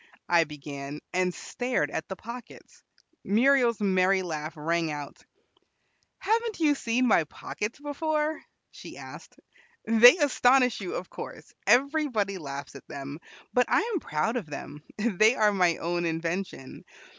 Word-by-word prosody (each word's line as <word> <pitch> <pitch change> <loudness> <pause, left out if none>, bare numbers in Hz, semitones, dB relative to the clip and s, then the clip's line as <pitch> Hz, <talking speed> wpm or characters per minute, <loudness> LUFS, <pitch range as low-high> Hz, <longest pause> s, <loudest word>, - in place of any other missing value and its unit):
I 170 -1 +4
began, 145 -1 -7 0.2
and 185 0 +1
stared 245 - -2
at 160 - -4
the 190 - -5
pockets. 235 +4 -11 0.4
Muriel's 240 +2 +3
merry 190 -1 +2
laugh 155 -1 -5
rang 165 +2 0
out. 145 -1 -7 0.9
"Haven't 455 -1 -1
you 305 -3 +4
seen 250 -2 0
my 170 -8 +4
pockets 210 +8 -6
before?" 305 +1 -2 0.3
she - - -11
asked. - - -11 0.5
"They 230 +7 +8
astonish 255 -4 +3
you, 370 - -4
of - - -6
course; - - -9
everybody 250 -7 +2
laughs 140 -2 -7
at 140 - -13
them; 140 +2 -7 0.3
but 250 -1 +3
I - - +4
am 375 - 0
proud 220 - -1
of 210 -9 -5
them; 145 0 -8 0.2
they 215 +1 +3
are 210 -3 +3
my 180 -4 +2
own 175 0 -1
invention. 165 -3 -4
200 Hz, 140 wpm, -27 LUFS, 160-250 Hz, 0.9 s, They